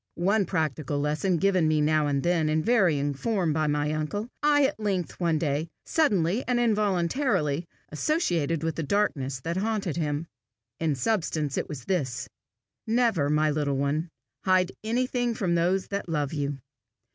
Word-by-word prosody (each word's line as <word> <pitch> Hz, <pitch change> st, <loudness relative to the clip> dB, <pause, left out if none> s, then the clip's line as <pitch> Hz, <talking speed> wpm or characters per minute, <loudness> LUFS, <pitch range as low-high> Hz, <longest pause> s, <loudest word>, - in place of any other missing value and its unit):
One 195 Hz, +3 st, +2 dB
practical 155 Hz, -5 st, -1 dB
lesson 150 Hz, +5 st, 0 dB
given 185 Hz, -2 st, +2 dB
me 155 Hz, -1 st, +2 dB
now 150 Hz, 0 st, +2 dB
and 140 Hz, -1 st, 0 dB
then 170 Hz, -3 st, +2 dB
in 155 Hz, 0 st, +1 dB
varying 165 Hz, -11 st, +2 dB
form 180 Hz, -, 0 dB
by 155 Hz, 0 st, +1 dB
my 150 Hz, 0 st, 0 dB
uncle, 155 Hz, +8 st, -2 dB
I 290 Hz, -1 st, +4 dB
at 270 Hz, -, -2 dB
length, 195 Hz, -5 st, -2 dB
one 170 Hz, -3 st, +2 dB
day, 150 Hz, 0 st, -1 dB, 0.2 s
suddenly 205 Hz, -, +2 dB
and 250 Hz, -1 st, +2 dB
involuntarily 200 Hz, -, +1 dB, 0.2 s
associated 165 Hz, -, 0 dB
with 160 Hz, -2 st, -2 dB
the -, -, -1 dB
darkness 140 Hz, -7 st, 0 dB
that 165 Hz, +4 st, -3 dB
haunted 200 Hz, -5 st, -1 dB
him. 150 Hz, -1 st, -1 dB, 0.5 s
In 160 Hz, -3 st, +1 dB
substance 155 Hz, -, -1 dB
it -, -, -2 dB
was 130 Hz, -5 st, -7 dB
this: 140 Hz, -10 st, -1 dB, 0.6 s
"Never, 225 Hz, -11 st, +2 dB
my 150 Hz, 0 st, +2 dB
little 145 Hz, -2 st, 0 dB
one, 145 Hz, +5 st, -1 dB, 0.3 s
hide 185 Hz, -1 st, +3 dB
anything 245 Hz, +1 st, 0 dB
from 180 Hz, -5 st, 0 dB
those 180 Hz, +3 st, +1 dB
that 200 Hz, -3 st, -3 dB
love 150 Hz, -3 st, -1 dB
you. 145 Hz, -2 st, -2 dB
165 Hz, 160 wpm, -27 LUFS, 150-200 Hz, 0.6 s, I